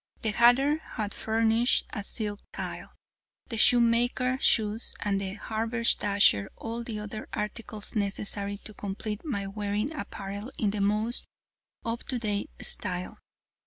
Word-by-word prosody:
The 220 - +1
hatter 245 +7 +5
had 215 -9 -5
furnished 225 +2 +2
a 205 - -3
silk 205 -1 -2
tile, - - -6 0.6
the 230 - -3
shoemaker, 245 +3 +4
shoes, 220 -1 +2
and 195 -1 0
the 195 0 -4
haberdasher 220 - +2
all 230 +1 -4
the 230 -2 -4
other 210 +1 -6
articles 210 0 -4
necessary 200 0 -1
to 215 - -5
complete 205 +2 -5
my 230 -11 -2
wearing 210 +6 -2
apparel 200 -2 -6
in 210 -2 +1
the 205 0 -2
most 210 +4 +1 0.6
up 230 0 -2
to 255 - 0
date 210 -3 -1
style. 180 0 0
215 Hz, 130 wpm, -28 LUFS, 205-235 Hz, 0.6 s, hatter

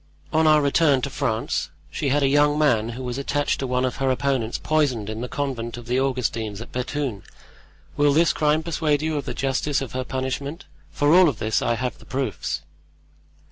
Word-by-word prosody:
"On 160 0 +4
our 155 -1 +5
return 140 -2 +3
to 140 - -2
France 110 -9 -1 0.2
she 140 - -1
had 145 +2 +2
a - - +4
young 145 +1 +3
woman 120 -8 +2
who 130 - -5
was 125 +1 -3
attached 145 +1 0
to 135 - -2
one 125 0 +1
of 125 - -2
her 135 -1 +1
opponents 130 -3 0
poisoned 130 -9 0
in 110 +1 -5
the 125 - -3
convent 120 -5 -3
of 120 - -9
the 125 +2 +1
Augustines 115 -6 -1
at 115 - -9
Bethune. 125 -4 -3 0.8
Will 145 0 +4
this 160 +2 +4
crime 155 +1 +2
persuade 155 -3 0
you 160 0 -1
of 140 - -3
the - - -4
justice 135 +1 0
of 135 -4 -5
her 130 0 -2
punishment—for 140 +3 -3
of 180 0 +7
all - - +3
this 110 0 -1
I 120 - +1
have 125 0 -3
the - - -16
proofs?" 110 - -3
135 Hz, 200 wpm, -23 LUFS, 120-145 Hz, 0.8 s, of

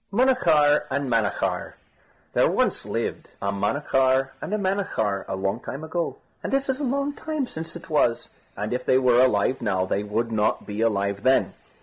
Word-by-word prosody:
MUNACHAR 170 - +3
AND 140 -1 -1
MANACHAR 100 -5 0 0.6
There - - +4
once - - 0
lived - - -3
a 100 - -1
Munachar 130 +4 +1
and - - -5
a 215 - +1
Manachar, 185 - -1
a - - -3
long 95 +3 -1
time 135 +4 -7
ago, 165 +1 -3 0.2
and - - -4
it 275 0 0
is 265 0 -1
a - - -3
long 280 +2 0
time 310 -2 -3
since 160 -8 -7
it 170 - -9
was, 145 -7 +1 0.3
and 105 +3 -2
if 125 0 -2
they 130 - +3
were 125 -2 +4
alive 130 0 +2
now 95 -5 0
they 100 +2 -1
would 110 +3 -2
not 105 -1 0
be 105 +1 -4
alive 100 -3 0
then. 130 +3 +3
130 Hz, 185 wpm, -24 LUFS, 105-170 Hz, 0.6 s, There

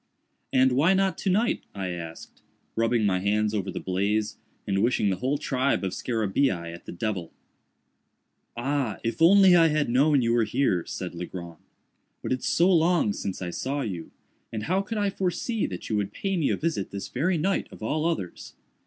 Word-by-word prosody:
"And 130 0 +4
why 155 +9 +4
not 190 0 +2
to 195 - -1
night?" 220 +6 +2
I 95 -2 -3
asked, 85 -2 -8 0.3
rubbing 115 -1 +2
my 95 -2 +2
hands 105 +2 +1
over 100 -2 -2
the - - -4
blaze, 100 +3 -1 0.3
and 100 -1 0
wishing 110 -3 +2
the 95 - -1
whole 130 +8 0
tribe 130 -4 0
of 95 - -1
scarabæi 105 -6 -1
at 85 - -12
the - - -5
devil. 90 -2 -3 1.3
"Ah, 130 -4 -1
if 115 +7 -3
I 165 - +9 0.4
had 150 -4 +1
only - - -2
known 140 +2 +4
you 115 0 +2
were 120 -1 +3
here!" 110 -6 +1
said 90 -2 -5
Legrand, 85 0 -7 0.7
"but - - -3
it's 130 - -2
so 180 +3 +4
long 165 - +3
since 95 -2 -4
I 90 - -3
saw 140 +9 -2
you; 90 -9 -5 0.4
and 110 -2 -4
how 185 - +1
could 215 +3 -5
I 205 -1 +1
foresee 195 +5 -1
that 90 - -7
you 110 - 0
would 105 0 -2
pay 195 -1 -2
me 165 -5 +1
a - - +1
visit 155 - -2
this 100 -1 -6
very 165 +8 0
night 190 +5 0
of - - -11
all 155 +8 0
others? 130 - -4
115 Hz, 190 wpm, -26 LUFS, 95-155 Hz, 1.3 s, I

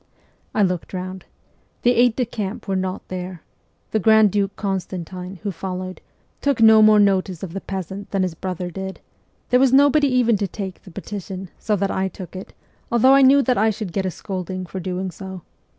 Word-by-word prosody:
I 210 - +4
looked 180 -2 -1
round. 185 +1 -6 0.6
The 245 - +5
aides 245 -1 +4
de 250 - 0
camp 215 -3 -5
were 195 - 0
not 185 0 -3
there; 180 -2 -6 0.5
the 220 - +1
grand 220 0 +5
duke 200 0 0
Constantine, 185 -1 -4
who 205 - -1
followed, 185 +1 -6 0.4
took 280 -4 +1
no 220 -1 +7
more 215 0 +7
notice 190 -3 +2
of 175 -3 -6
the 195 - -4
peasant 190 +1 -6
than 195 -1 0
his 180 -3 -1
brother 180 +1 -4
did; 190 +2 -6 0.5
there 250 - +5
was 265 -1 +4
nobody 285 +2 +5
even 245 -4 +3
to 200 0 -1
take 190 -1 -6
the - - -14
peti 200 +3 -6
tion, 190 0 -7
so 215 - 0
that 200 0 -1
I 190 0 0
took 185 -1 -9
it, 185 - -9 0.4
although 240 +3 +5
I 275 - +6
knew 275 +1 +6
that 250 -4 +1
I 220 +1 +4
should 205 -4 -4
get 190 -1 -1
a - - 0
scolding 185 0 -5
for 190 +2 -6
doing 185 +1 -3
so. 190 -1 -9
195 Hz, 200 wpm, -22 LUFS, 185-220 Hz, 0.6 s, no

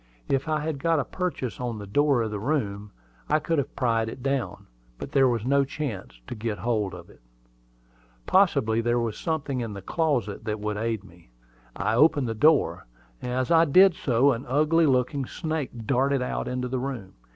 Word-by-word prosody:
If 135 +3 0
I 155 -1 0
had 155 -2 -3
got 165 +2 +2
a 140 - 0
purchase 160 - -4
on 120 -3 -3
the 105 - -7
door 135 +4 +2
of 110 - -3
the 105 - -3
room, 105 -6 -2 0.4
I 155 - +4
could 160 0 0
have 140 - -4
pried 115 -3 +1
it 125 +2 -9
down; 135 -2 -2 0.3
but - - -7
there 135 -1 +4
was 120 -3 -1
no 140 +2 +3
chance 135 - -6
to - - -6
get 110 -2 -3
hold 105 -2 -1
of 85 -1 -11
it. - - -21 1.0
Possibly 140 - +3
there 120 +1 +1
was 115 -2 -1
something 145 -5 -2
in 115 -3 -4
the 100 - -7
closet 125 - -1
that 105 0 -2
would 105 0 -3
aid 110 -2 -2
me. 85 -8 -18 0.5
I 110 - -1
opened 145 +1 +4
the 115 - -1
door. 110 - +2 0.3
As 125 +2 -2
I 165 0 +6
did 185 +5 +6
so, 140 -5 +2
an 125 0 -4
ugly 155 +5 +3
looking 130 0 +1
snake 155 -9 -4
darted 135 +1 +1
out - - -3
into 125 0 -2
the 130 +1 -2
room. 125 -8 -5
125 Hz, 195 wpm, -26 LUFS, 110-145 Hz, 1.0 s, I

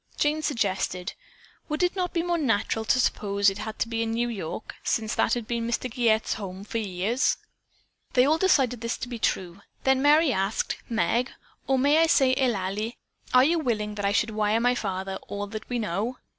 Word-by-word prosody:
Jane 300 +1 +1
suggested: 195 - -1 0.6
"Would 305 +3 0
it 355 - +1
not 360 -2 -1
be 335 - 0
more 345 -1 0
natural 225 -4 0
to 255 - +3
suppose 200 -4 +2
it 195 - -8 0.2
to - - -1
be 230 -1 -2
a 230 - 0
New 235 +2 0
York 200 -3 -5
bank, - - -10
since 220 -2 0
that 225 - +2
had 240 -2 -4
been 230 0 -2
Mr. 235 - -1
Giguette's 225 -3 +2
home 195 -2 -7
for 225 +2 -3
years?" 210 +5 0 0.8
They 250 0 +5
all 310 +3 +3
decided 265 - +2
this 230 0 -2
to - - -5
be 240 -2 -6
true. 185 -2 -1 0.2
Then 265 0 +3
Merry 295 0 +5
asked: 195 +2 -1
"Meg, 235 +2 +1 0.4
or 270 - +3
may 285 +4 +4
I 330 - +5
say 265 -5 +4
Eulalie, 215 -2 -1 0.3
are 255 0 +6
you 330 +4 +3
willing 215 -7 -1
that 205 -1 -3
I 200 - +2
should 215 +2 +1
wire 215 +1 +1
my 245 +1 +3
father 190 -4 -3
all 205 0 -4
that 215 +1 -8
we 245 - -1
know? 220 +4 -2
230 Hz, 200 wpm, -26 LUFS, 205-260 Hz, 0.8 s, are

